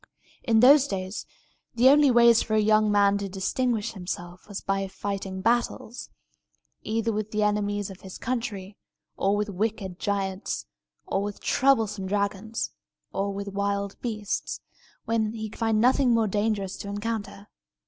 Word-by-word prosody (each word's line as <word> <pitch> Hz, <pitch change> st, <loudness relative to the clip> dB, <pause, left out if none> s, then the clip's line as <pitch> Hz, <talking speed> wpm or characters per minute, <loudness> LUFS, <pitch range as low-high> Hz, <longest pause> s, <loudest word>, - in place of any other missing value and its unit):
In 225 Hz, -3 st, +3 dB
those 280 Hz, +2 st, +7 dB
days, 190 Hz, -1 st, -4 dB, 0.5 s
the 240 Hz, +2 st, +5 dB
only 290 Hz, 0 st, +6 dB
way 235 Hz, -1 st, +7 dB
for 220 Hz, -1 st, +1 dB
a -, -, +4 dB
young 215 Hz, 0 st, +4 dB
man 200 Hz, -1 st, +4 dB
to 200 Hz, -1 st, -4 dB
distinguish 220 Hz, +4 st, -1 dB
himself 180 Hz, -2 st, -7 dB
was 205 Hz, -2 st, -5 dB
by 195 Hz, 0 st, -1 dB
fighting 195 Hz, -1 st, -4 dB
battles, 235 Hz, +1 st, -1 dB, 0.7 s
either 225 Hz, +1 st, -1 dB
with 215 Hz, 0 st, -3 dB
the 215 Hz, 0 st, 0 dB
enemies 205 Hz, -1 st, 0 dB
of 190 Hz, -, -12 dB
his 190 Hz, -1 st, -9 dB
country, 215 Hz, -6 st, -4 dB, 0.4 s
or 195 Hz, +1 st, +1 dB
with 210 Hz, +1 st, 0 dB
wicked 200 Hz, -2 st, -3 dB
giants, 195 Hz, -1 st, -2 dB, 0.4 s
or 195 Hz, -, -1 dB
with 205 Hz, 0 st, -4 dB
troublesome 225 Hz, -8 st, +2 dB
dragons, 200 Hz, +2 st, -2 dB, 0.4 s
or 200 Hz, +1 st, -1 dB
with 200 Hz, 0 st, -5 dB
wild 200 Hz, 0 st, -2 dB
beasts, 215 Hz, -4 st, -3 dB, 0.5 s
when 225 Hz, -1 st, 0 dB
he 220 Hz, -1 st, -5 dB
could -, -, -13 dB
find 225 Hz, -2 st, +2 dB
nothing 250 Hz, +1 st, +4 dB
more 225 Hz, -1 st, +3 dB
dangerous 205 Hz, -1 st, -1 dB
to -, -, -7 dB
encounter. 205 Hz, -1 st, -4 dB
205 Hz, 150 wpm, -26 LUFS, 195-225 Hz, 0.7 s, those